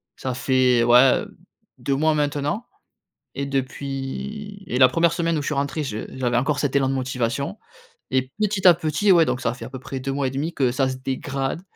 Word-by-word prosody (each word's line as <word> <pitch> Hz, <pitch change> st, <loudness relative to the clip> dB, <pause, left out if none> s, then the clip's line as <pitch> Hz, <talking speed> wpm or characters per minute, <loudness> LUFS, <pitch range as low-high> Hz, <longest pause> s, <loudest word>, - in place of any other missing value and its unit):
ça 130 Hz, -2 st, -4 dB
fait, 130 Hz, -2 st, +3 dB
ouais, 125 Hz, +2 st, +5 dB, 0.6 s
2 140 Hz, -, -1 dB
mois 155 Hz, +3 st, +2 dB
maintenant 145 Hz, -, -1 dB, 0.7 s
et 140 Hz, -, -2 dB
depuis 140 Hz, +10 st, -4 dB
et 125 Hz, -, -2 dB
la 130 Hz, -, +8 dB
1re 165 Hz, +5 st, +2 dB
semaine 165 Hz, -2 st, 0 dB
où -, -, -1 dB
je 145 Hz, -, -5 dB
suis -, -, 0 dB
rentré 140 Hz, +2 st, -1 dB
je 110 Hz, -5 st, -4 dB
j'avais 120 Hz, -2 st, 0 dB
encore 140 Hz, +3 st, +1 dB
cet 145 Hz, -2 st, -1 dB
élan 135 Hz, -1 st, +2 dB
de 135 Hz, -, 0 dB
motivation 130 Hz, -, -2 dB, 0.5 s
et 130 Hz, 0 st, 0 dB
petit 210 Hz, -2 st, 0 dB
à 180 Hz, -, +10 dB
petit, 170 Hz, +5 st, +1 dB
ouais, 170 Hz, -2 st, +6 dB
donc 130 Hz, -, -2 dB
ça 115 Hz, -, 0 dB
fait 125 Hz, -, -9 dB
à -, -, -8 dB
peu 130 Hz, -1 st, -8 dB
près 135 Hz, 0 st, -6 dB
2 135 Hz, +1 st, -3 dB
mois 140 Hz, -1 st, 0 dB
et -, -, -3 dB
demi 145 Hz, +6 st, -3 dB
que 130 Hz, -6 st, +1 dB
ça 135 Hz, +1 st, +1 dB
se 130 Hz, -, -3 dB
dégrade 135 Hz, +3 st, -3 dB
135 Hz, 215 wpm, -23 LUFS, 130-155 Hz, 0.7 s, à